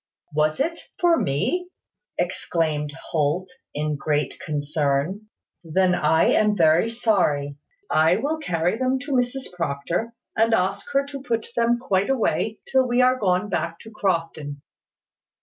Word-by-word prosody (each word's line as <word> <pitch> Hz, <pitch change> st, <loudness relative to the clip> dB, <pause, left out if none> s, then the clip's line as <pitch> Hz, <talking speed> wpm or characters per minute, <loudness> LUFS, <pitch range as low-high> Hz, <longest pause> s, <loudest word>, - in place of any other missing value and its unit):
"Was 155 Hz, +1 st, +1 dB
it 330 Hz, +5 st, 0 dB, 0.2 s
for 345 Hz, -1 st, +5 dB
me?" 250 Hz, -, 0 dB, 0.5 s
exclaimed 160 Hz, -4 st, -1 dB, 0.2 s
Holt, 160 Hz, -, 0 dB, 0.2 s
in 150 Hz, 0 st, -1 dB
great 150 Hz, +1 st, -1 dB
concern. 150 Hz, +6 st, -1 dB, 0.4 s
"Then 180 Hz, +3 st, +2 dB
I 160 Hz, -1 st, +3 dB
am 210 Hz, -1 st, +3 dB
very 165 Hz, +5 st, +4 dB
sorry. 175 Hz, -12 st, +1 dB, 0.3 s
I 160 Hz, -, +4 dB
will 290 Hz, +9 st, -1 dB
carry 175 Hz, -, 0 dB
them 260 Hz, 0 st, +1 dB
to 285 Hz, +1 st, -6 dB
Mrs 250 Hz, -3 st, -1 dB
Proctor, 175 Hz, +7 st, -2 dB, 0.2 s
and 225 Hz, +1 st, +4 dB
ask 195 Hz, 0 st, -1 dB
her 275 Hz, 0 st, +3 dB
to 280 Hz, -1 st, -7 dB
put 230 Hz, -4 st, -2 dB
them 235 Hz, 0 st, +3 dB
quite 200 Hz, -5 st, 0 dB
away 220 Hz, -4 st, 0 dB
till 260 Hz, -1 st, +3 dB
we 245 Hz, +1 st, +3 dB
are 255 Hz, 0 st, +3 dB
gone 185 Hz, 0 st, +1 dB
back 165 Hz, -3 st, -2 dB
to 220 Hz, -, -12 dB
Crofton." 165 Hz, -8 st, -2 dB
185 Hz, 140 wpm, -23 LUFS, 155-240 Hz, 0.5 s, for